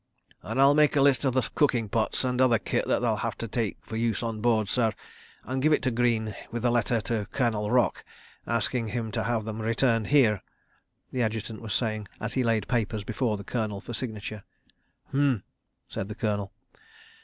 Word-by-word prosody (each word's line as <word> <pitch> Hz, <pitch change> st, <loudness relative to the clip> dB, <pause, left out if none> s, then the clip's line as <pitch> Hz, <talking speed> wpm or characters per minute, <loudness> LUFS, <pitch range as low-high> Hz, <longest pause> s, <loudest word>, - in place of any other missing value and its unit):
"... -, -, -44 dB
And 115 Hz, +4 st, -3 dB
I'll 140 Hz, +1 st, +7 dB
make 150 Hz, 0 st, +4 dB
a 140 Hz, -, +4 dB
list 140 Hz, 0 st, +4 dB
of 130 Hz, -1 st, +1 dB
the 130 Hz, -4 st, +2 dB
cooking 125 Hz, -7 st, +2 dB
pots 110 Hz, +5 st, 0 dB
and 125 Hz, 0 st, +1 dB
other 125 Hz, -3 st, +5 dB
kit 95 Hz, -, -1 dB
that -, -, +2 dB
they'll -, -, +2 dB
have -, -, -3 dB
to 115 Hz, -, -4 dB
take 110 Hz, -1 st, -2 dB
for 110 Hz, -, -6 dB
use 115 Hz, -1 st, 0 dB
on 115 Hz, -2 st, -3 dB
board, 110 Hz, -3 st, +2 dB
sir, 115 Hz, 0 st, +1 dB, 0.5 s
and 130 Hz, +1 st, -2 dB
give 155 Hz, +2 st, +4 dB
it -, -, +2 dB
to 130 Hz, -, +2 dB
Greene 115 Hz, -3 st, +1 dB
with 120 Hz, +1 st, -3 dB
a 120 Hz, -, +4 dB
letter 120 Hz, -1 st, +1 dB
to 105 Hz, -1 st, -2 dB
Colonel 110 Hz, -5 st, 0 dB
Rock 120 Hz, -5 st, +2 dB, 0.4 s
asking 115 Hz, +1 st, 0 dB
him 110 Hz, 0 st, -3 dB
to 115 Hz, 0 st, -1 dB
have 115 Hz, -2 st, 0 dB
them 110 Hz, 0 st, -4 dB
returned 115 Hz, 0 st, +1 dB
here," 115 Hz, -9 st, +4 dB, 0.7 s
the 130 Hz, -, -1 dB
Adjutant 110 Hz, 0 st, -2 dB
was 110 Hz, -2 st, -3 dB
saying, 110 Hz, -3 st, -1 dB
as 105 Hz, +1 st, -4 dB
he 130 Hz, -, +1 dB
laid 115 Hz, -3 st, +1 dB
papers 110 Hz, -3 st, -1 dB
before 110 Hz, 0 st, -1 dB
the 100 Hz, -, -8 dB
Colonel 110 Hz, -3 st, -2 dB
for 120 Hz, -, -8 dB
signature. 110 Hz, -3 st, -5 dB, 0.7 s
"H'm!" 135 Hz, -6 st, +2 dB, 0.4 s
said 95 Hz, -, -4 dB
the 105 Hz, -, -6 dB
Colonel. 105 Hz, -3 st, -1 dB
115 Hz, 200 wpm, -27 LUFS, 110-125 Hz, 0.7 s, I'll